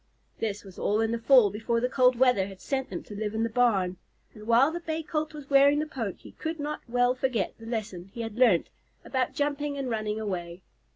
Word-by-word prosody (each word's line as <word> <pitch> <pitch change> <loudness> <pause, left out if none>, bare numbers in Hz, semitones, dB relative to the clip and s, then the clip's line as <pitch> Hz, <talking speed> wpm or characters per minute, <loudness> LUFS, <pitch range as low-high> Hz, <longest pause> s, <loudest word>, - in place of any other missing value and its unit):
This 210 -2 -3
was 190 -3 -12
all 210 +1 +1
in 225 0 +1
the 235 - -1
fall, 240 -4 +6
before 225 +3 -1
the 250 - +1
cold 255 -1 +4
weather 245 -6 +3
had 195 -1 -11
sent 265 +5 -2
them - - -5
to - - -11
live 210 +1 -3
in 220 - 0
the 230 - 0
barn, 200 -7 +2 0.4
and 215 0 -12
while 245 +6 +5
the 345 - -4
Bay 320 -1 -3
Colt 310 0 -2
was 295 -3 -10
wearing 280 +1 +5
the 305 - 0
poke 230 -10 -5
he - - -12
could 320 0 -5
not 295 +1 -4
well 245 +1 +3
forget 255 -5 -1
the 225 - -10
lesson 200 -6 -4
he 235 - -6
had 225 -2 -5
learned 235 -8 +4 0.4
about 260 -1 -1
jumping 290 0 -1
and 265 -3 -3
running 215 -1 -2
away. 180 -4 -5
235 Hz, 230 wpm, -28 LUFS, 210-275 Hz, 0.4 s, fall